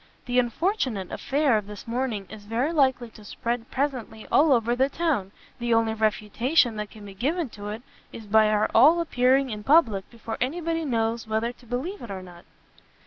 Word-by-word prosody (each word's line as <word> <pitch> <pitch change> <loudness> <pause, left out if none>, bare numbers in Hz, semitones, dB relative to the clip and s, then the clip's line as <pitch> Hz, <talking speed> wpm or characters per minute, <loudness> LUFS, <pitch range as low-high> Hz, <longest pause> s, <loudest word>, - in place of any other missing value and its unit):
The 245 0 +2
unfortunate 250 - -1
affair 280 -4 +1
of 205 - -11
this 210 +1 -10
morning 230 -4 -2
is 215 -1 -11
very 240 +9 -1
likely 260 -6 +2
to 215 - -15
spread 235 +3 -4
presently 255 -6 -3
all 305 +1 +5
over 240 -1 +3
the 265 +2 +2
town; 285 - -1 0.3
the 240 -1 +1
only 225 -1 +2
refutation 220 +4 +1
that 210 -1 -4
can 210 -2 -13
be 200 - -9
given 290 - -1
to 205 -1 -8
it, 220 +3 -6 0.3
is 225 - -9
by 215 +1 +4
our 210 0 +2
all 320 +5 +6
appearing 265 -4 +2
in 210 -1 -6
public 230 - +3
before 225 -1 -7
any 270 +8 -1
body 330 -1 -2
knows 230 -3 -1
whether 220 +2 -1
to 245 - -20
believe 270 - -4
it 235 - -8
or 190 -1 -6
not." 175 -1 -14
235 Hz, 195 wpm, -25 LUFS, 215-270 Hz, 0.3 s, all